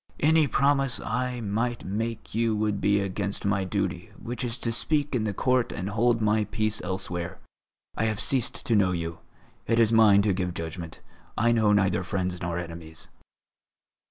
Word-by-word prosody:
Any 155 0 +4
promise 135 -1 +2
I 125 +2 -2
might 115 +3 -2
make 110 +4 -4
you 115 0 +1
would 105 -1 -1
be 100 0 +3
against 100 +1 -3
my 100 -1 +1
duty, 95 - -2
which 120 +2 -5
is 120 -1 -2
to 115 -1 -2
speak 145 +5 0
in 115 -4 0
the 105 - 0 0.2
Court 125 -1 +3
and 95 +3 -4
hold 115 +1 +2
my 105 0 +2
peace 110 0 -2
elsewhere. 90 -2 -4 0.6
I 110 - 0
have 110 -2 -1
ceased 130 -4 0
to 115 - +2
know 95 -3 +3
you. 85 -1 -4 0.5
It 115 - +2
is 115 -1 +4
mine 105 -3 +6
to 100 -2 +2
give 90 -1 -2
judgment; 80 0 -6 0.4
I 120 +1 +3
know 110 -3 +3
neither 95 -3 +3
friends 90 -1 -2
nor 85 0 -2
enemies." 85 -2 -7
105 Hz, 175 wpm, -27 LUFS, 95-115 Hz, 0.6 s, mine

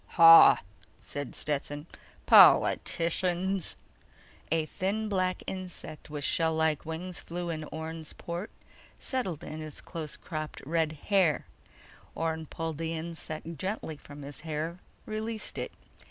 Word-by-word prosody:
"Hah!" 165 -1 +10 0.4
said 145 -2 -6
Stetson. 145 0 -2 0.4
"Politicians!" 180 +2 +4 0.8
A 160 -1 +2
thin 200 +7 -2
black 185 -2 0
insect 180 -5 -7
with 150 -1 -5
shell 160 +3 +2
like 160 -1 +1
wings 175 +2 -5
flew 175 0 -4
in 155 -1 -4
Orne's 160 0 -5
port, 175 +4 -5 0.5
settled 235 - -2
in 155 - -6
his 155 -1 -7
close 160 -4 -6
cropped 155 -2 -5
red 160 +1 +1
hair. 175 0 +2 0.7
Orne 160 -1 -2
pulled 165 -1 -4
the 165 0 -2
insect 160 -1 -6
gently 190 -4 -3
from 145 0 -11
his 140 0 -8
hair, 160 +2 -4 0.3
released 215 0 -3
it. - - -3
165 Hz, 125 wpm, -30 LUFS, 155-180 Hz, 0.8 s, Hah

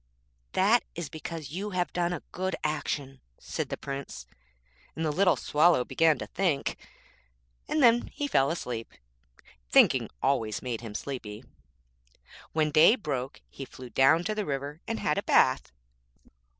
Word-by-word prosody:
'That 210 +6 +4
is 165 -3 -5
because 155 -2 -7
you 195 +6 -4
have 180 - -1
done 175 -1 0
a 175 - -4
good 185 +1 -2
action,' 140 -3 -3 0.2
said - - -4
the - - -4
Prince. 140 - -6 0.7
And 160 - -2
the 155 - +1
little 180 +3 +3
Swallow 150 -4 +3
began 160 -3 +3
to - - -5
think, 170 -7 -1 0.9
and 305 -2 +1
then 240 0 +5
he 290 - -4
fell 135 - +3
asleep. 125 -9 -4 0.8
Thinking - - +5
always 115 -6 0
made 120 -3 -3
him 110 -3 -8
sleepy. 115 -4 -6 1.1
When 155 -1 +1
day 160 +9 +7
broke 140 - -4
he 140 - -9
flew 130 -2 -11
down 135 +8 +4
to 215 +4 -1
the 210 0 -2
river 145 +1 -4
and 225 - -2
had 150 - 0
a - - -5
bath. - - +3
150 Hz, 150 wpm, -28 LUFS, 135-175 Hz, 1.1 s, day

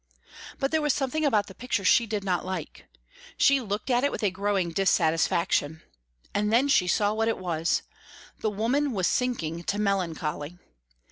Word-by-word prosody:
But 270 - -1
there 315 -1 +2
was 295 -3 +2
something 285 +3 -1
about 215 -7 +2
the 190 - -12
picture 235 -2 -2
she 235 +4 +4
did 210 -2 -3
not 180 -3 0
like. 185 -4 -6 0.5
She 275 -1 +4
looked 210 +3 -3
at 245 +1 +2
it 285 - +2
with - - -5
a 200 - +2
growing 195 -2 -1
dissatisfaction. 165 -3 +1 0.5
And 210 +1 0
then 255 +5 +3
she 180 -10 +3
saw 205 +3 +2
what 225 +1 0
it 225 - 0
was. 170 -2 -1 0.6
The 215 - 0
woman 245 +7 0
was 190 -4 0
sinking 170 -11 -1
to 205 - -1
melancholy. 175 -5 -2
205 Hz, 175 wpm, -26 LUFS, 175-245 Hz, 0.6 s, she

